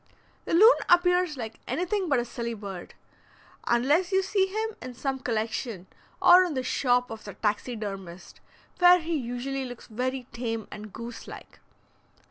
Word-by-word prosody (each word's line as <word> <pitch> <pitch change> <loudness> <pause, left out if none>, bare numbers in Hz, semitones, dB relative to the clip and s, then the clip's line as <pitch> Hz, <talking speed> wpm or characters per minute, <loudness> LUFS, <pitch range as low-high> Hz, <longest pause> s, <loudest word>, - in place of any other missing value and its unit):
The - - 0
loon 440 +8 +8
appears 355 -3 +3
like 225 -3 -6
anything 365 +1 -1
but 280 - +3
a 240 - 0
silly 235 -1 -4
bird, 195 -4 -8 0.7
unless 290 +10 +2
you 380 0 +3
see 385 0 +1
him 435 +2 -3
in 255 -1 -8
some 270 +1 -2
collection, 225 -4 -3 0.3
or 360 +1 +8
in 345 -5 -3
the 260 - -1
shop 250 -1 +1
of 225 -1 -8
the 205 - -9
taxidermist, 205 -5 -4 0.4
where 355 0 +8
he 330 0 -2
usually 265 +1 -3
looks 245 -2 -8
very 255 +3 -3
tame 225 -3 -3
and 210 0 -9
goose 235 +2 -8
like. - - -11
250 Hz, 155 wpm, -27 LUFS, 225-350 Hz, 0.7 s, loon